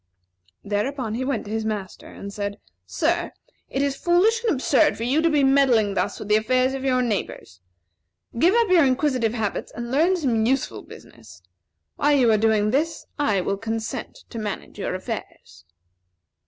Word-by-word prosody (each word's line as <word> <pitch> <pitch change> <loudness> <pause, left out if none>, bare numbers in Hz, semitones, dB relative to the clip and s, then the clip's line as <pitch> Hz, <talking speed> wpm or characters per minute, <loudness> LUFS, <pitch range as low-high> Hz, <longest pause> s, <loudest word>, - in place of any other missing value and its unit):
Thereupon 215 +3 -2
he 245 +3 -2
went 260 -3 -2
to 205 - -8
his 220 0 -1
master, 210 -4 -5
and 200 0 -9
said: 200 0 -4 0.3
"Sir, - - -1 0.4
it 270 - -1
is 280 -1 0
foolish 385 +10 +2
and 455 - +2
absurd 290 +2 +2
for 230 - -4
you 270 +6 +2
to 335 - +3
be 295 -3 +2
meddling 265 -7 +3
thus - - -1
with - - -8
the 210 0 +4
affairs 255 +4 +1
of 270 0 -4
your 255 -2 +2
neighbors. 195 - -4 0.8
Give 355 - +4
up 470 -3 +3
your 355 -3 +6
inquisitive 255 -4 +1
habits, 215 -3 -3
and 235 +1 -6
learn 335 +7 +3
some 245 -9 +1
useful 250 - -1
business. 90 - -15 0.5
While 290 0 +3
you 245 -4 +4
are 215 - +4
doing 215 -1 +2
this, 310 +6 -1
I 215 -10 +2
will 195 +2 -2
consent 225 +1 -5
to 230 - -5
manage 210 -2 -6
your - - -2
affairs." - - -8
250 Hz, 175 wpm, -23 LUFS, 215-280 Hz, 0.8 s, your